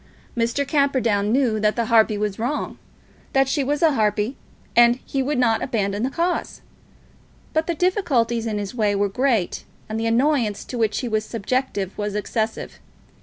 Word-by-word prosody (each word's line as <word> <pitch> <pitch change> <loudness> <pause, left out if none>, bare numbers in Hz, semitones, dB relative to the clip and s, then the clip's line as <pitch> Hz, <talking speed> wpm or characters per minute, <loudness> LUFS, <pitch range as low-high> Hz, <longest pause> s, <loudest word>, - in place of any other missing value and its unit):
Mr. 235 +4 0
Camperdown 255 -8 +1
knew 240 -4 +2
that 210 0 +2
the 235 - 0
harpy 220 -2 +4
was 210 -1 -2
wrong, 255 +6 -3 0.5
that 270 0 +3
she 280 +1 0
was 290 +4 -1
a 320 - +6
harpy, 215 +1 0 0.4
and 240 0 +6
he 270 - -1
would 280 +2 -1
not 230 -3 +2
abandon 205 -5 -1
the 255 - 0
cause; 345 +5 -2 0.9
but 315 +1 +1
the 340 - -1
difficulties 275 - +1
in 215 -2 -2
his 205 +1 -4
way 210 -4 +1
were 200 0 +2
great, 230 -3 0 0.2
and 220 +1 -3
the 225 - -1
annoyance 235 -3 +1
to - - -7
which 225 -3 0
he 250 - -3
was 215 -2 0
subjected 220 -3 -2
was 205 0 -2
excessive. 220 +1 -3
230 Hz, 170 wpm, -22 LUFS, 210-270 Hz, 0.9 s, a